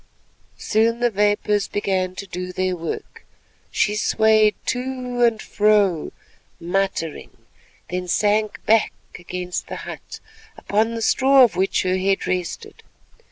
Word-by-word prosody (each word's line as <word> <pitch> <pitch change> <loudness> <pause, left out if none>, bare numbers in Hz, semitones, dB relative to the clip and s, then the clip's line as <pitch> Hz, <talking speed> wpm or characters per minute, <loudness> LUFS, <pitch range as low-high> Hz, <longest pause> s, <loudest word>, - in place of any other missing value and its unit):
Soon 230 +2 +1
the 240 -1 +2
vapours 205 0 +1
began 185 -2 -1
to 200 - -6
do 180 -1 -6
their 185 0 -1
work; 165 -1 -6 0.5
she 210 -3 +1
swayed 215 0 +3
to 250 -1 -3
and 230 -2 +3
fro 205 -7 +2 0.5
muttering, 175 -2 -3 0.5
then 180 0 -3
sank 210 +3 0
back 220 0 +3 0.3
against 180 0 -5
the - - -6
hut, - - -9 0.4
upon 220 +3 0
the 225 - -3
straw 270 +2 +5
of 240 - +3
which 190 +1 +1
her 185 0 0
head 195 +1 0
rested. 185 - -4
205 Hz, 125 wpm, -22 LUFS, 185-225 Hz, 0.5 s, straw